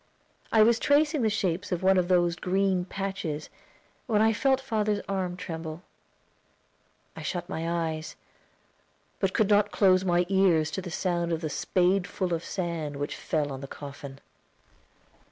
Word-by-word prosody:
I 220 -1 +6
was 230 +1 +4
tracing 295 0 +3
the 220 - +3
shape 190 -4 -1
of 180 0 -1
one 190 +1 +5
of 175 - 0
those 175 -2 +3
green 185 0 0
patches 190 -6 -4 0.6
when 220 -4 +2
I 220 +1 +4
felt 265 +4 +2
father's 215 -5 -1
arm 185 -2 -2
tremble. 165 -2 -6 1.3
I - - -8
shut 175 -2 -3
my 165 -3 -3 0.2
eyes, 155 0 -5 1.0
but 195 -2 0
could 215 -1 +2
not 205 0 +4
close 185 -2 +4
my 175 -1 +2
ears 180 -5 +3
to 170 - -3
the 180 - -7
sound 175 0 -1
of 165 -1 -1
the 155 -2 -3
spadeful 185 0 0
of 165 0 -2
sand 170 -5 -3
which 145 +1 -3
fell 150 -3 -2
on 135 0 -6
the 140 - -6
coffin. 140 -1 -9
180 Hz, 155 wpm, -27 LUFS, 165-200 Hz, 1.3 s, I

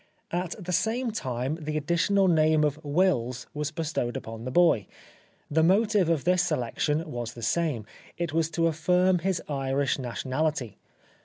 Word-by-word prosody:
At 175 0 -2
the 185 -3 -6
same 230 +6 0
time 130 - -3
the 155 0 -2
additional 175 +6 +2
name 155 -2 +4
of 150 +1 -1
Wills 145 -6 +1
was 150 0 -2
bestowed 155 -6 -2
upon 115 +1 -8
the - - -2
boy. 160 - +4 0.6
The 160 +2 +3
motive 200 +1 +3
of 165 -5 +1
this 180 0 +3
selection 150 +2 -1
was 120 -2 -5
the 120 - -9
same. 150 -7 0 0.3
It 170 -3 -2
was 165 -1 +1
to 165 - +3
affirm 180 +3 +2
his 185 0 -1
Irish 135 -1 0
nationality. 130 +1 -2
155 Hz, 155 wpm, -27 LUFS, 135-175 Hz, 0.6 s, name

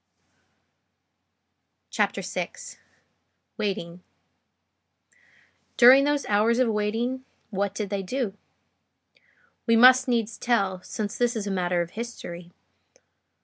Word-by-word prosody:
CHAPTER - - -1
VI—WAITING 180 -5 -7 1.8
During 260 +3 +8
those 290 -1 0
hours 215 +3 +2
of 255 -2 +2
waiting, 225 +5 -2 0.3
what 200 0 -2
did 210 -2 -4
they 200 -1 -1
do? 210 +1 -3 1.3
We 230 - +4
must 255 +2 +7
needs 230 -2 -1
tell, 195 -6 0
since 210 +2 -5
this 240 0 +1
is 215 -2 -3
a 200 - -3
matter 180 -2 0
of 170 - -12
history. 180 -7 -8
215 Hz, 100 wpm, -25 LUFS, 195-240 Hz, 1.8 s, During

